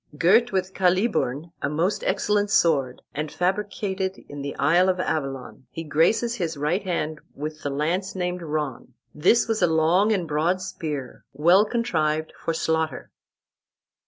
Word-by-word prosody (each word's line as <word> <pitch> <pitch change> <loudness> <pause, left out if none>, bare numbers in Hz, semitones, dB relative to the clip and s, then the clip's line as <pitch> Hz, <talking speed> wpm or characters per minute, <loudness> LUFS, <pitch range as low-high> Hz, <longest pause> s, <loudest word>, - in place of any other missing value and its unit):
Girt 220 +10 +4
with 190 -1 -1
Caliburn, 180 - +1
a 140 - 0
most 170 +7 0
excellent 205 +1 +1
sword, 140 -10 +2
and 150 +1 -4
fabricated 190 0 -2
in 145 0 -7
the 140 0 -5
isle 175 +5 +3
of 185 -1 0
Avalon, 135 -6 -3
he 165 - -6
graces 165 +10 +2
his 170 -8 -3
right 150 +7 0
hand 160 -5 -3
with 155 +1 -6
the 145 - -2
lance 165 +8 -1
named 180 -1 -2
Ron. 150 -6 -4 0.2
This 230 +12 +3
was 225 -1 -1
a - - +5
long 165 +6 +3
and 185 -6 0
broad 160 +5 +1
spear, 155 -8 -5
well 175 +8 +5
contrived 160 -10 -1
for - - -3
slaughter." 160 -2 -1
170 Hz, 150 wpm, -24 LUFS, 150-190 Hz, 0.2 s, a